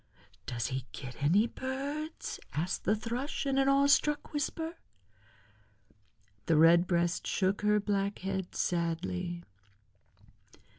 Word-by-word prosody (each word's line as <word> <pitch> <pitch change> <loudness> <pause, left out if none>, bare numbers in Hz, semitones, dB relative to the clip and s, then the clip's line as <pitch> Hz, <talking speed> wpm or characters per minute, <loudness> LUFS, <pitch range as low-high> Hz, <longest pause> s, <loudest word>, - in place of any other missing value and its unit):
"Does 115 -2 -2
he 130 -1 -4
get 130 0 -8
any 180 +10 +4
birds?" 280 +6 -4
asked 170 +5 -2
the 210 - +3
Thrush 240 +7 -3
in 270 -1 +1
an 270 0 +4
awe 275 0 +5
struck 295 +2 +2
whisper. 320 +3 -2 1.7
The 160 - +4
Redbreast 170 +2 +4
shook 195 0 +1
her 210 0 +3
black 200 -1 -1
head 190 -1 -4
sadly. 175 +1 -1
195 Hz, 110 wpm, -31 LUFS, 170-270 Hz, 1.7 s, awe